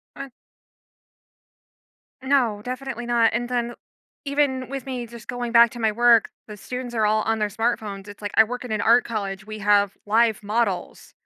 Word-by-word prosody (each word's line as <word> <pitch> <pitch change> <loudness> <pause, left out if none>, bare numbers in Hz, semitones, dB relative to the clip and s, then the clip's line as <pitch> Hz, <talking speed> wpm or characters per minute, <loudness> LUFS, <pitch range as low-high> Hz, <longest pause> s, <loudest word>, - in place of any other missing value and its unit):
I 275 - -7 1.9
No, 255 -6 +1
definitely 255 -1 -5
not. 235 -1 +3
And 240 +1 -2
then 240 -1 -1 0.5
even 275 -3 0
with 275 0 -5
me 255 -2 -4
just 235 0 -12
going 245 -1 -4
back 235 0 +6
to 240 - -9
my 220 -1 +2
work, 235 0 +4 0.2
the 210 - -8
students 250 +3 -6
are 220 -1 +2
all 215 0 +2
on 225 0 0
their 210 -1 0
smartphones. 210 -2 -3
It's 205 0 -12
like, 205 -1 -4
I 220 - +9
work 245 +3 -6
in 250 - -7
an 215 -1 0
art 235 +2 +5
college, 195 -3 -4
we 215 0 -7
have 205 -1 +2
live 220 +1 +2
models. 205 -3 -2
230 Hz, 180 wpm, -23 LUFS, 210-245 Hz, 1.9 s, I